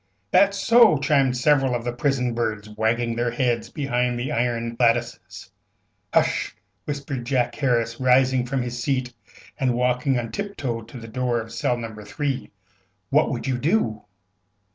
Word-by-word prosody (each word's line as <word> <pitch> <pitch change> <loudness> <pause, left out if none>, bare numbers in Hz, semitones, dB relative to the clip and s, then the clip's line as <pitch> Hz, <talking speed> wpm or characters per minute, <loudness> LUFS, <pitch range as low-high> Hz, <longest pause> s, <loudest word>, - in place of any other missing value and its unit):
"That's 200 0 +4
so!" 230 -6 +6
chimed 135 -2 +2
several 135 -1 +3
of 120 - -3
the 120 0 -3
prison 125 -2 0
birds, 110 -3 -2
wagging 115 +2 0
their 120 +1 0
heads 120 -2 -1
behind 125 -4 -1
the 125 - -3
iron 115 -1 -1
lattices. 115 -7 -1 0.6
"Hush!" - - +1 0.3
whispered 140 -3 -4
Jack 120 -1 0
Harris, 115 -4 0
rising 130 0 +3
from 130 0 -1
his 120 0 -5
seat 130 -3 -1 0.5
and 130 -3 +1
walking 125 +2 +1
on 115 -2 -3
tip 200 0 -5
toe 120 -5 -3
to 120 +3 -11
the 115 - -9
door 120 +1 -1
of 115 0 -8
cell 120 +1 0
No. 115 -2 -6
3. 125 +6 -4 0.6
"What - - +4
would - - -4
you 130 -2 -1
do?" 140 - 0
125 Hz, 160 wpm, -23 LUFS, 115-135 Hz, 0.6 s, so